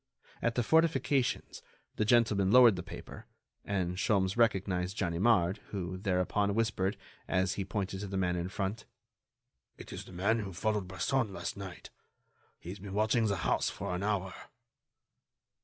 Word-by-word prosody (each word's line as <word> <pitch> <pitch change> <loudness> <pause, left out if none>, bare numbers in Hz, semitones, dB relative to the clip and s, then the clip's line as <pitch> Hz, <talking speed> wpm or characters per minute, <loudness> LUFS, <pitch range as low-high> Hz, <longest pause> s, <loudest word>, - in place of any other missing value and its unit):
At 115 -1 0
the 120 - +2
fortifications 140 -3 +1 0.4
the 110 - +1
gentleman 110 -4 +3
lowered 120 -1 +7
the 90 - -4
paper, 85 - -10 0.4
and 90 -3 -2
Sholmes 95 -1 +1
recognized 95 -4 +1
Ganimard, 95 +1 +2
who 95 -2 -4
thereupon 100 +1 0
whispered, 110 -4 0 0.3
as 95 0 +1
he 100 - -3
pointed 95 0 -3
to 100 - -5
the 95 0 -3
man 90 -1 +1
in 90 +1 -2
front: 100 +3 -3 0.9
"It - - -10
is - - -7
the - - -13
man 100 +6 +1
who 100 -3 -5
followed 105 +1 -1
Bresson 105 +5 0
last - - -5
night. 95 -3 -9 0.7
He 85 - -10
has 100 +3 -7
been 95 0 -8
watching 110 +2 +2
the 100 - +1
house - - +2
for 100 -2 -4
an 90 - -2
hour." 100 -2 -1
100 Hz, 155 wpm, -31 LUFS, 95-110 Hz, 0.9 s, lowered